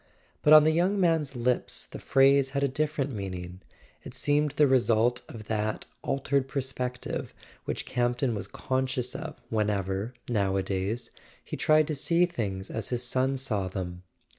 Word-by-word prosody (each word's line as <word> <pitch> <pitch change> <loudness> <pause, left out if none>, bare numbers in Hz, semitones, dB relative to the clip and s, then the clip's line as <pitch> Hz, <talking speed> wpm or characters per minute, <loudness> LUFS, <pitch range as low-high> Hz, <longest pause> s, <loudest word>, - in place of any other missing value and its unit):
But 150 - +3
on 155 -1 +10
the 155 - +4
young 180 +5 +2
man's 160 -6 +2
lips 125 +1 -1
the - - -9
phrase 135 0 +4
had 140 - +1
a - - +4
different 145 0 -1
meaning; 90 -4 -6 0.4
it - - -9
seemed 145 +3 +2
the 150 0 +4
result 125 -2 +3
of 110 -2 -8
that 110 0 -2 0.2
altered 135 0 0
perspective 130 -2 -3 0.3
which - - -3
Campton 125 +1 0
was 105 - -4
conscious 130 -1 -2
of 160 -2 -6
whenever, 105 +1 -1
nowadays, 100 0 -1 0.3
he - - -5
tried 155 0 +4
to 155 - -2
see 170 +5 +3
things 100 - -4
as 110 - -3
his 125 -1 -1
son 130 +2 +1
saw 110 -8 -1
them. 90 -2 -5
125 Hz, 155 wpm, -28 LUFS, 105-140 Hz, 0.4 s, on